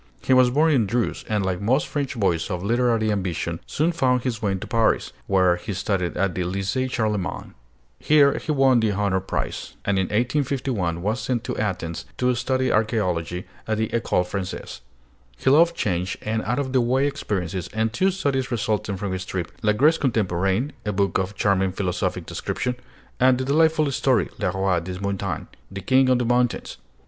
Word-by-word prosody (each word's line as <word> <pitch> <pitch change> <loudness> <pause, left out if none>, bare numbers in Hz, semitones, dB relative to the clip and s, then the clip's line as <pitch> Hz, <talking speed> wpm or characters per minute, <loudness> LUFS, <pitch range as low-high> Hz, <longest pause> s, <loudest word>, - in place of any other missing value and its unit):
He 130 - +3
was 130 -1 +6
born 155 +5 +3
in 120 -8 +3
Dreuze, 120 +4 -1
and 105 -3 0
like 95 -1 -2
most 130 +8 +2
French 140 -5 -3
boys 85 -5 +1
of 90 -2 -3
literary 115 0 +2
ambition, 85 -4 -2
soon 160 +4 +1
found 130 -7 +1
his 120 -3 -2
way 100 -3 0
to 95 - -5
Paris, 115 -3 +1
where 95 -2 +3
he 105 +4 -5
studied 95 -2 -1
at 95 -1 +1
the 90 - -2
Lycée 95 +8 -1
Charlemagne. 105 -7 -2 0.5
Here 145 -2 +4
he 155 - -3
won 135 -4 +4
the 110 -2 +1
honor 100 -1 +1
prize; 95 - -4
and 100 -1 +1
in 95 - +1
1851 120 - -1
was 110 +4 0
sent 120 -3 -1
to - - -3
Athens 90 -6 -3
to 125 0 +2
study 130 +2 0
archaeology 90 -6 0 0.2
at 110 0 0
the 110 0 -1
École 110 -5 0
Française. 95 0 -5 0.6
He 130 - +2
loved 170 +4 +5
change 90 - -1
and 110 +1 -1
out 120 +4 0
of 135 -2 -2
the 130 - +4
way 130 +3 +2
experiences, 95 - -3
and 110 +1 -1
two 190 +10 +2
studies 140 -9 -1
resulted 105 -4 -1
from 100 0 -3
this 95 0 -3
trip: 90 -3 -4
'La 105 -1 +3
Grèce 150 +9 +4
Contemporaine,' 105 0 0
a 105 - -1
book 100 0 +1
of 95 +2 -3
charming 95 -1 +2
philosophic 90 -2 -2
description; 125 0 -3 0.4
and 130 0 +5
the 130 - -2
delightful 155 +1 +3
story - - +1
'Le - - +1
Roi 95 -2 +1
des 90 +2 -6
Montagnes' 100 -2 -3 0.2
(The 95 0 -7
King 130 +2 +3
of 130 - +4
the 125 - 0
Mountains). 120 0 0
110 Hz, 185 wpm, -23 LUFS, 95-130 Hz, 0.6 s, was